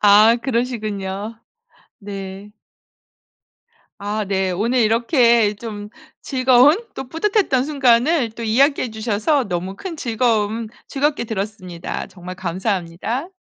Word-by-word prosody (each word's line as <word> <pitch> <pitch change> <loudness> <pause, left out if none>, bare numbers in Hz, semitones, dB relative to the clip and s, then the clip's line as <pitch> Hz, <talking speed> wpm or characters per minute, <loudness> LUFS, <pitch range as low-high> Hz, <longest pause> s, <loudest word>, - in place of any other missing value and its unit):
아 210 +3 +7
그러시군요. 215 -4 -3 0.6
네. 195 0 -8 1.5
아 205 +1 -2
네. 190 -1 0
오늘 225 +8 0
이렇게 230 -1 +3
좀 210 -1 -7 0.3
즐거운 260 +2 +5 0.2
또 260 - -6
뿌듯했던 330 - +1
순간을 270 -1 +3
또 230 +2 -9
이야기해 255 +3 +2
주셔서 220 +6 0
너무 185 0 -4
큰 370 - -6
즐거움 225 -3 0 0.2
즐겁게 285 -2 0
들었습니다. 195 -5 -5
정말 180 0 -9
감사합니다. 190 - -3
220 Hz, 245 characters per minute, -20 LUFS, 200-255 Hz, 1.5 s, 아